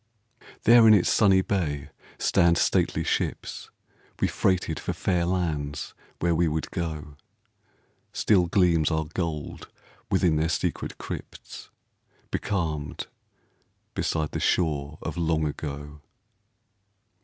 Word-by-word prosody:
There 115 -1 +7
in 110 - +9
its 95 - +3
sunny 95 -3 +4
bay 75 -9 -2 0.3
stand 85 -1 +3
stately - - +1
ships, - - -2 0.5
We - - +2
freighted 95 -1 0
for - - -3
fair 90 -2 0
lands 80 -6 -2 0.2
where 85 0 +1
we 85 +1 +2
would 80 0 -2
go; 75 -4 -5 0.9
Still 95 -5 +3
gleams 85 -4 +3
our 80 -1 0
gold 80 -1 -4 0.4
within 80 -4 +2
their 80 +1 +1
secret - - -2
crypts, - - -8 0.6
Becalmed 80 -7 -2 0.9
beside 80 -2 -1
the - - -3
shore 75 -3 0
of - - -4
Long 80 -2 +1
Ago. 75 0 -6
80 Hz, 110 wpm, -26 LUFS, 75-90 Hz, 0.9 s, in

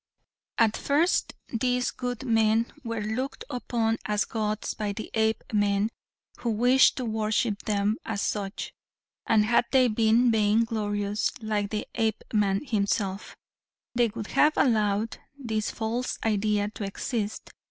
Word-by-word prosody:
"At 225 -2 +3
first, 310 +6 +1
these 250 +1 0
good 245 0 -4
men 225 -1 +2
were 230 -3 -3
looked 245 +6 -3
upon 230 -3 -1
as 210 0 0
gods 215 -1 -2
by 210 -2 -3
the 220 - -7
Apemen 215 -1 +1 0.5
who 240 - -2
wished 245 +4 +4
to 255 - -2
worship 215 -1 0
them 210 0 +1
as 220 -2 -3
such, 200 -1 -3 0.5
and 215 -2 +4
had 235 +2 +3
they 260 -2 +5
been 230 +2 +3
vain 215 +1 +3
glorious 205 -2 -1
like 210 -2 -1
the 210 0 -3
Apeman 215 -1 0
himself, 200 -3 -1 0.6
they 240 -1 +3
would 220 0 -7
have 300 +1 +5
allowed 215 -3 +1 0.2
this 220 -6 -2
false 235 +2 -2
idea 210 -1 +1
to 215 - -6
exist. 210 +2 -4
220 Hz, 130 wpm, -27 LUFS, 210-235 Hz, 0.6 s, they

